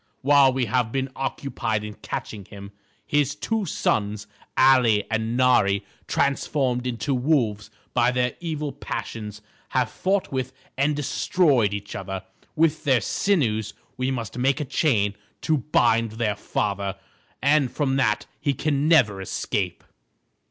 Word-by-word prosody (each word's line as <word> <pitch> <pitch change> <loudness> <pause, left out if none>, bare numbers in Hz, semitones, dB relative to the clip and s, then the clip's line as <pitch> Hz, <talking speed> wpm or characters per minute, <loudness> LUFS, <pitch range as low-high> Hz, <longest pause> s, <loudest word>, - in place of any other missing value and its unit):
While 140 -1 +6
we 130 -1 0
have 120 -2 0
been 135 0 -2
occupied 135 -5 -2
in 105 0 -6
catching 105 -1 -6
him, 100 0 -10 0.3
his 145 -2 +1
two 220 -4 -2
sons, 105 -6 -1 0.3
Ali 125 -6 +5
and 110 +1 -1
Nari, 100 -6 +3 0.2
transformed 130 -3 0
into 125 +3 -2
wolves 125 -6 +1 0.2
by 120 0 +3
their 125 0 0
evil 155 -4 -3
passions, 105 -4 -6 0.3
have 125 -3 +1
fought 195 +1 0
with 130 -1 -2 0.2
and 140 +3 +1
destroyed 130 - +2
each 100 0 -5
other. 95 0 -5 0.3
With 160 -1 +2
their 130 -4 +4
sinews 115 - 0 0.2
we 130 +1 -1
must 120 -2 -4
make 135 +4 +2
a 150 - -2
chain 110 -8 +1 0.3
to 155 -2 +1
bind 115 -5 +2
their 110 -2 -1
father, 100 -1 -2 0.4
and 140 -1 +3
from 135 -3 0
that 105 -6 +1
he 140 -2 0
can 145 +1 0
never 110 -12 +4
escape." 95 - -3
125 Hz, 140 wpm, -24 LUFS, 105-140 Hz, 0.4 s, While